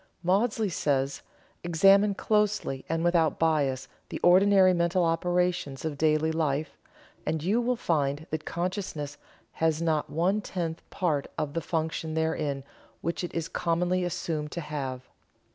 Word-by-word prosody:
Maudsley 210 +4 +2
says: 140 -4 0 0.4
"Examine 195 +4 +5
closely 210 -11 0
and 165 0 0
without 170 -2 +2
bias 145 -5 +1 0.2
the - - -5
ordinary 185 +1 +6
mental 170 +1 +2
operations 175 -3 0
of 155 -2 -2
daily 155 +1 +2
life, 155 -2 -1 0.5
and 155 -1 -2
you 210 +7 +2
will 250 +1 +1
find 150 -7 0
that 155 0 -2
consciousness 170 -5 -4 0.3
has 160 -1 0
not 160 -3 0
one 185 +7 +1
tenth 170 -4 -4
part 155 -7 -1
of 150 -2 -2
the 165 - -1
function 160 -1 -2
therein 155 -4 -1 0.4
which 170 +3 -2
it 175 - -4
is 165 -1 -1
commonly 180 +2 0
assumed 155 -3 -3
to 170 - -3
have. 135 -4 -5
165 Hz, 140 wpm, -28 LUFS, 150-180 Hz, 0.5 s, ordinary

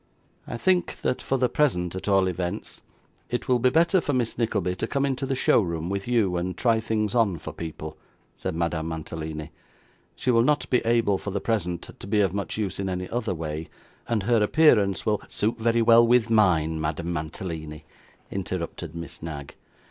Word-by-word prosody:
'I - - -4
think 180 +6 +1
that, 125 - 0
for 135 - 0
the 125 0 +3
present 90 - +1
at 95 - -6
all 95 -2 +4
events, 90 -1 -4 0.5
it 125 - -3
will 125 -1 +3
be 130 +2 +4
better 170 +6 +3
for 145 - -1
Miss 120 -3 0
Nickleby 100 -6 0
to 115 - -2
come 140 +2 0
into 135 0 -1
the 135 - 0
show 125 - +4
room 85 -1 -3
with 100 +1 -3
you, 110 -7 +2
and 90 0 -3
try 115 -2 +3
things 110 -2 -1
on 110 -7 +2
for 80 0 -8
people,' 80 -1 -7 0.4
said - - -4
Madame 85 -1 -1
Mantalini. 80 -1 -5 0.6
'She 130 - 0
will 115 -1 +5
not 130 0 +2
be 125 - +5
able 115 -4 +2
for - - -5
the 100 +1 -2
present 90 -6 -2
to - - -8
be 105 +1 +2
of 95 -3 +2
much 100 -3 -3
use 105 -3 -2
in 95 -1 -1
any 90 0 -3
other 115 -5 -2
way; 80 0 -5 0.4
and 110 -4 0
her 115 +1 +3
appearance 105 -5 +4
will 105 -2 +1
' - - -23
'Suit 110 +3 -1
very 115 +1 +2
well 115 0 +7
with 120 -1 +3
mine, 80 -7 +3
Madame 80 +3 -2
Mantalini,' 80 -1 -5 0.5
interrupted 85 -3 -4
Miss 85 0 -7
Knag. 75 -4 -6
100 Hz, 195 wpm, -25 LUFS, 85-115 Hz, 0.6 s, well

